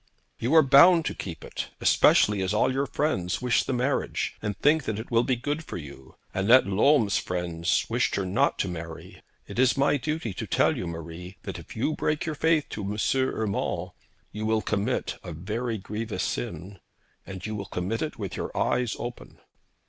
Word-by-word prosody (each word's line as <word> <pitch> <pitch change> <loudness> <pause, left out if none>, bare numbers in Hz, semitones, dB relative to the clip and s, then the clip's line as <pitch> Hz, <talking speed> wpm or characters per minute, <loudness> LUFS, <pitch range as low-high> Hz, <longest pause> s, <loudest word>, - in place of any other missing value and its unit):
'You 125 +8 +1
are 160 - +8
bound 160 +5 +7
to - - -1
keep 85 -5 -7
it, - - -5
especially 105 -2 +4
as 95 +3 0
all 120 - +2
your 140 +1 0
friends 95 - -1
wish 125 -1 +2
the - - -3
marriage, 130 +2 -1
and 105 -2 -3
think 150 0 +3
that 110 - -2
it 110 +3 -7
will 115 0 +4
be 130 0 +1
good 145 +6 -3
for - - -6
you. 70 -4 -11 0.2
Annette 115 +7 +5
Lolme's 105 +2 +3
friends 90 -1 -1
wished - - 0
her 100 - -1
not 95 +1 +1
to - - 0
marry. 80 -2 -8 0.2
It - - -6
is 130 +1 +4
my 140 +1 +3
duty 155 -6 -3
to - - -5
tell - - +2
you, 90 - -4
Marie, 85 +2 -8
that - - -6
if - - -12
you 130 +8 0
break 150 0 -1
your 160 - -2
faith 155 0 +2
to - - -5
M. 100 +1 -3 0.2
Urmand, 110 -6 -1 0.4
you 110 +1 -4
will 110 -1 +1
commit 100 0 -1
a - - -6
very 110 +8 -3
grievous 105 0 -4
sin, 90 +10 -4 0.5
and 95 -1 -7
you 110 - -3
will 100 -1 -4
commit 95 +6 -3
it 155 - -3
with 100 -5 -5
your - - -3
eyes 125 -2 +1
open.' 120 0 -7
110 Hz, 195 wpm, -26 LUFS, 95-130 Hz, 0.5 s, are